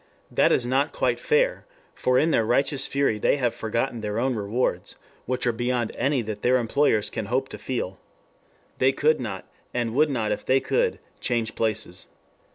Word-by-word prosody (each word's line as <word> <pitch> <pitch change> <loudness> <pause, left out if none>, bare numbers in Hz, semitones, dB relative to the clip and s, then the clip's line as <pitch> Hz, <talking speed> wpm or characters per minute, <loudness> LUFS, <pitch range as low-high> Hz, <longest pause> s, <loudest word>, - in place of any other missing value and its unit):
That - - +3
is 120 - +2
not 135 +4 +1
quite - - 0
fair, - - +1 0.3
for 125 0 +1
in 160 +4 +3
their 115 - +3
righteous 135 +4 +1
fury 140 -6 +1
they 145 - +2
have 125 -4 0
forgotten 115 +2 -2
their 105 0 -3
own 130 +2 +1
rewards, 105 -3 -2 0.3
which 125 0 -1
are 120 - +3
beyond 120 0 -1
any 135 -3 +1
that 105 -1 -5
their 125 +1 +4
employers 115 -2 +1
can 110 -3 -4
hope 130 +3 0
to - - -8
feel. 115 -7 -4 0.8
They 130 +1 +4
could 155 +3 +2
not, 105 -7 -5 0.3
and 120 -2 -1
would 150 +4 +3
not 115 -6 -1
if 105 - -2
they 130 +1 +3
could, 475 - 0 0.2
change 115 -3 -1
places. 110 -5 -2
125 Hz, 180 wpm, -25 LUFS, 110-135 Hz, 0.8 s, their